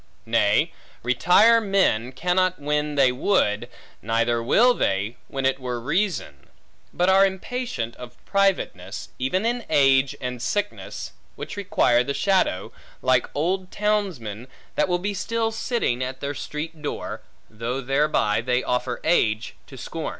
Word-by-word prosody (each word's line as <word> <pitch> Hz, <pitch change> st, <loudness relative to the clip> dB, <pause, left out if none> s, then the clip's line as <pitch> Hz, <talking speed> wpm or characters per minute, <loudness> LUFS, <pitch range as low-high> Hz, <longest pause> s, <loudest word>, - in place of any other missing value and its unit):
Nay, -, -, +2 dB, 0.3 s
retire 180 Hz, -, +5 dB
men 190 Hz, -, +1 dB
cannot 180 Hz, +5 st, +1 dB
when 150 Hz, 0 st, -1 dB
they 135 Hz, -3 st, +5 dB
would, 125 Hz, -, +1 dB, 0.3 s
neither 115 Hz, +1 st, +1 dB
will 240 Hz, -, +4 dB
they, 100 Hz, -, -1 dB
when 135 Hz, -1 st, -3 dB
it 135 Hz, 0 st, +1 dB
were 125 Hz, -2 st, -3 dB
reason; 150 Hz, -, -2 dB, 0.4 s
but 180 Hz, -, +1 dB
are 190 Hz, +1 st, +6 dB
impatient 190 Hz, -, -2 dB
of 125 Hz, -1 st, -10 dB
privateness, 195 Hz, -, 0 dB
even 185 Hz, -, 0 dB
in 240 Hz, +1 st, 0 dB
age 135 Hz, -1 st, +4 dB
and 125 Hz, -1 st, -5 dB
sickness, 205 Hz, -, -3 dB, 0.2 s
which -, -, -7 dB
require 125 Hz, -11 st, +2 dB
the 140 Hz, +2 st, -3 dB
shadow; 190 Hz, -, +1 dB, 0.3 s
like 130 Hz, -1 st, +2 dB
old 180 Hz, +5 st, -1 dB
townsmen, 180 Hz, -, -2 dB, 0.3 s
that 150 Hz, -, +1 dB
will 180 Hz, -1 st, +1 dB
be 200 Hz, +3 st, -3 dB
still 225 Hz, +3 st, -1 dB
sitting 220 Hz, -, -1 dB
at 130 Hz, +1 st, -5 dB
their 140 Hz, +1 st, -3 dB
street 150 Hz, +3 st, -6 dB
door, 150 Hz, -, -5 dB, 0.3 s
though 115 Hz, +4 st, -4 dB
thereby 135 Hz, -5 st, +1 dB
they 125 Hz, +1 st, 0 dB
offer 125 Hz, 0 st, -1 dB
age 110 Hz, -9 st, +1 dB
to -, -, -12 dB
scom. -, -, -5 dB
140 Hz, 140 wpm, -24 LUFS, 125-190 Hz, 0.4 s, are